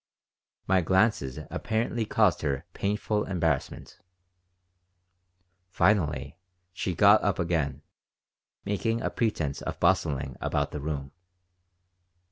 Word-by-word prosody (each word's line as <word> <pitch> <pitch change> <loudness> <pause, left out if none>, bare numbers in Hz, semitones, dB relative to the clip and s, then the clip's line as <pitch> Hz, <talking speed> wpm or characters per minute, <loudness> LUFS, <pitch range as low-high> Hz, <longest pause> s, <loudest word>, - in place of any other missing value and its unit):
My 95 0 +3
glances 95 - +1
apparently 115 +1 -1
caused 105 -3 +2
her 70 -4 -2
painful 105 +1 -1
embarrassment. 80 -7 -2 1.7
Finally 80 -8 +1 0.3
she 90 0 -3
got 100 +4 +6
up 100 - +1
again, 80 -5 -1 0.8
making 115 +3 -1
a - - -1
pretense 80 - -1
of - - -5
bustling 75 -7 +1
about - - -1
the 75 - -5
room. 70 -2 -4
90 Hz, 95 wpm, -28 LUFS, 75-105 Hz, 1.7 s, got